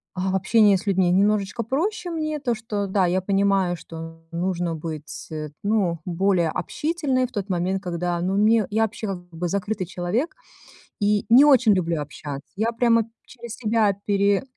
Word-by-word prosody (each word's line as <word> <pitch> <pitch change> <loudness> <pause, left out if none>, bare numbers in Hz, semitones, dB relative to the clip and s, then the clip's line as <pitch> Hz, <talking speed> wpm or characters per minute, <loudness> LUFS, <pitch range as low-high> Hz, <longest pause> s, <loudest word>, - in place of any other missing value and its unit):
а, 190 +1 -1
в - - 0
общении 205 +2 +4
с 190 - -4
людьми 190 -2 +3
немножечко 205 +3 +1
проще 350 - -2
мне, 310 -2 -2
то, 245 -4 -1
что, 210 -2 -3
да, 190 -1 +2
я 180 +2 +1
понимаю, 195 -2 +1
что 165 0 -10
нужно 175 -1 -1
быть, 155 -1 -7
э, 155 -1 -4
ну, 200 -5 +1
более 180 -1 +1
общительной 275 - -1
в - - -21
тот 205 -4 -4
момент, 185 +2 -1
когда, 175 -1 -2
ну, 185 +2 0
мне 215 +1 +4
Я 220 +2 +2
вообще, 220 0 -3
как 175 -2 -6
бы, 175 +1 -4
закрытый 200 +1 -2
человек 185 - -2 0.6
и 205 0 +1
не 255 +5 +8
очень 255 -7 +6
люблю 170 -4 0
общаться. 145 0 -8
Я 220 +4 0
прямо 230 -1 +3 0.2
через 235 -2 -9
себя 220 -3 +2
пере 200 +1 +2
200 Hz, 175 wpm, -23 LUFS, 175-225 Hz, 0.6 s, не